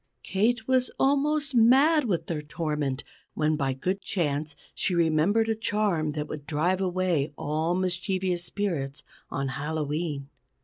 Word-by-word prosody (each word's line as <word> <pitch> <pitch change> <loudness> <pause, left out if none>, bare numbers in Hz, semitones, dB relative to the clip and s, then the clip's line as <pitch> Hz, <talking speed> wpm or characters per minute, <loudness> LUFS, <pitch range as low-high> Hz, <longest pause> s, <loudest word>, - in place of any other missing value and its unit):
Kate 220 +3 +1
was 255 -1 +2
almost 285 +1 +2
mad 265 +6 +5
with 185 -7 0
their 160 -3 -3
torment, 150 -3 -2 0.3
when 155 0 +2
by 135 -3 0
good 185 +9 -2
chance 150 -4 -2 0.2
she 180 - -1
remembered 170 +7 +3
a 225 - +2
charm 205 -8 0
that 150 0 -3
would 150 -1 -7
drive 175 +5 +1
away 180 -5 0
all 155 +4 0
mischievous 185 0 0
spirits, 165 -10 -3 0.3
on 140 -1 -2
Hallowe'en. 150 +1 -3
175 Hz, 135 wpm, -27 LUFS, 150-205 Hz, 0.3 s, mad